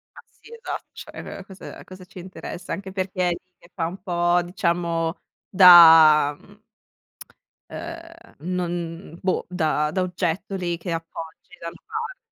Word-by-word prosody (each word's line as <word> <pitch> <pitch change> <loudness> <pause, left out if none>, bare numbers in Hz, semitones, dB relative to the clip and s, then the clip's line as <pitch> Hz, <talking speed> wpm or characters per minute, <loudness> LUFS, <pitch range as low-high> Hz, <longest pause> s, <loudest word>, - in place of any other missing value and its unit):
Ma - - -11
sì 465 - -19
esatto, 465 +1 -7
cioè 195 - -9
cosa 190 -1 -11
a - - -12
cosa 185 0 -12
ci 185 0 -14
interessa? 185 0 -8
Anche 195 -1 -6
perché 185 -1 -1
è - - +1
lì 170 - -1 0.2
che 170 - -21
fa 165 - -2
un 185 +2 -8
po', 175 -1 +1
diciamo 170 -3 -1 0.3
da, 160 -5 +8
mhmm 205 +1 -20 1.1
ehm, 335 0 -10 0.2
non 170 -1 -4
boh, 185 - -1
da 155 -4 0
da 190 - -1
oggetto 180 +1 -3
lì 175 -2 -2
che 170 +1 -7
appoggi 165 0 -8
da 170 - -6
una - - -12
parte. - - -5
175 Hz, 155 wpm, -23 LUFS, 165-190 Hz, 1.1 s, da